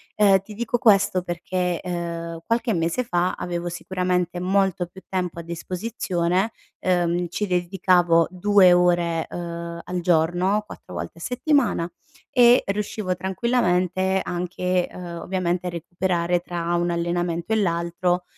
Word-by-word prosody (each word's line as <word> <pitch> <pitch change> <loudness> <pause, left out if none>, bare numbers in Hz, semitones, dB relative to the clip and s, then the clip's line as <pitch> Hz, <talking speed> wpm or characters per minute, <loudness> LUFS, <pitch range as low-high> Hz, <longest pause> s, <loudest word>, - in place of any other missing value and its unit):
Uhm, 200 -2 +5
ti 195 +3 -12
dico 235 +2 -1
questo 195 -5 +4
perché, 180 0 -2
uhm, 170 -1 -4
qualche 230 0 +1
mese 170 +8 0
fa, 175 -4 0
avevo 175 0 -4
sicuramente 180 0 -1
molto 190 -1 +1
più 190 +2 -14
tempo 180 -3 -2
a - - -3
disposizione, 180 +2 -2 0.3
uhm, 175 -1 +1
ci 190 +5 -2
dedicavo 175 -2 +3
2 185 0 +5
ore, 175 -2 +2
uhm 170 -1 -5 0.2
al 180 0 -1
giorno 175 +4 +2
4 - - -11
volte 170 - -6
a - - -13
settimana 250 - +1 0.4
e 245 -2 +6
riuscivo 200 -1 -2
tranquillamente, 190 -2 +1
anche, 180 0 -1
uhm, 175 -2 -7
ovviamente 180 -1 -1
a - - 0
recuperare 175 +1 -1
tra 175 -1 -3
un 175 0 +1
allenamento 170 +2 -1
e - - +3
l'altro, 175 -1 0
180 Hz, 135 wpm, -23 LUFS, 170-190 Hz, 0.4 s, e